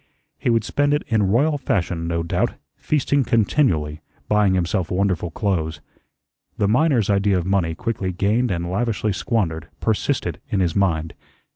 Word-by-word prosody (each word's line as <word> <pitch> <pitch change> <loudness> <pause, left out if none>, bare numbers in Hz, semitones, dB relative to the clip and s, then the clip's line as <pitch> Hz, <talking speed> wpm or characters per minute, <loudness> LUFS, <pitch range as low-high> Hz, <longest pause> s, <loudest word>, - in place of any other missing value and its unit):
He - - 0
would 115 -2 +2
spend 145 +5 +1
it 150 - -2
in 110 -2 +2
royal 145 +8 +2
fashion, 90 -10 -1
no 85 0 -1
doubt, 85 - -1 0.2
feasting 145 -1 +1
continually, 100 - +1 0.3
buying 105 -3 +3
himself 90 0 0
wonderful 90 -2 0
clothes. 80 -4 -2 0.8
The 100 - +2
miner's 120 - +3
idea 100 -1 +2
of 85 - -2
money 90 -4 0
quickly 110 -5 -2
gained 105 +7 +1
and 85 -2 -2
lavishly 105 +2 -1
squandered, 85 -6 -1
persisted 110 -2 -1
in 100 - 0
his 90 -3 +1
mind. 80 -5 +1
100 Hz, 150 wpm, -22 LUFS, 85-115 Hz, 0.8 s, buying